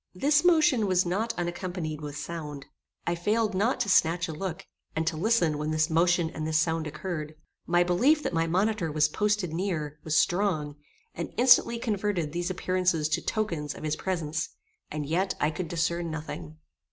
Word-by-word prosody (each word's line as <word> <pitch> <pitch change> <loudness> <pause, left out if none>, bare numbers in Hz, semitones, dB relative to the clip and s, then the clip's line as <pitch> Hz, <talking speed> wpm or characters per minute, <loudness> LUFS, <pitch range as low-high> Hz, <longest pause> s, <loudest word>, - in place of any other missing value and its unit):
This 295 +9 +3
motion 315 - +4
was 185 -1 +3
not 205 +6 0
unaccompanied 175 -3 -3
with 145 -1 -6
sound. 150 -2 -6 0.4
I 170 - +1
failed 210 +5 0
not 220 +8 +1
to 235 - 0
snatch 170 -2 +3
a 160 - -5
look, 165 +1 -5 0.3
and 160 +1 0
to 165 0 0
listen 170 -4 +2
when 150 +1 -2
this 155 +1 +1
motion 170 0 +3
and 155 -1 -4
this 160 0 +2
sound 160 0 0
occurred. 155 0 -5 0.3
My 175 +1 +4
belief 260 - +3
that - - -2
my 165 0 +1
monitor 185 0 0
was 155 0 +3
posted 210 0 0
near, 160 -5 -3
was 155 0 +1
strong, 175 -6 +1 0.4
and - - -5
instantly 245 -1 +6
converted 205 -8 -1
these 175 +3 -2
appearances 180 -4 0
to 155 - 0
tokens 165 -10 -2
of - - -10
his 155 0 0
presence, 160 -4 -2 0.4
and 150 -1 -4
yet 180 +6 0
I 150 - +2
could 165 +3 -4
discern 170 +1 -1
nothing. 85 - -6
170 Hz, 175 wpm, -28 LUFS, 155-195 Hz, 0.4 s, instantly